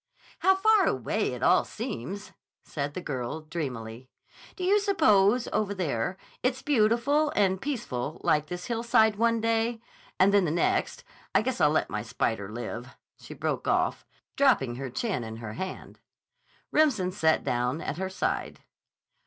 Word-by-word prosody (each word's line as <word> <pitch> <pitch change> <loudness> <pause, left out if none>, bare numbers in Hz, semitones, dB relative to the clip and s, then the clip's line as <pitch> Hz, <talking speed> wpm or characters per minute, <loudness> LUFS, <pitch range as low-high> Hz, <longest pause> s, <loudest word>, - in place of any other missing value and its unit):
"How 380 0 +4
far 425 +1 +4
away - - 0
it - - -6
all - - +5
seems!" 205 - -6 0.3
said 145 -1 -4
the 185 - -3
girl 130 +2 -4
dreamily. 130 -7 -6 0.5
"Do 370 - -6
you 400 +3 +4
suppose, 230 - +3
over 205 -1 0
there, 160 -3 -2 0.2
it's 255 +1 -1
beautiful 280 +3 +2
and 190 -2 +2
peaceful 155 - -3
like 150 0 +2
this 180 +2 -6
hillside 230 -2 +2
one 230 +1 +2
day, 225 +1 0 0.4
and 195 +2 +5
then 200 -2 +4
the - - 0
next—I 170 +5 -1
guess 260 +1 -2
I'll 150 - +6
let 155 - 0
my 105 - -2
spy 115 +1 -1
spider 100 -2 -7
live," 120 +2 -6 0.2
she - - -10
broke - - -2
off, - - +1 0.3
dropping 135 - +3
her 135 0 -5
chin 185 - -2
in 110 0 -7
her 110 -2 -7
hand. 185 +10 -7 0.7
Remsen 230 -13 +2
sat 160 -4 +2
down 125 +4 -1
at 150 - -4
her 190 +1 -2
side. 190 - -3
190 Hz, 155 wpm, -28 LUFS, -, 0.7 s, I'll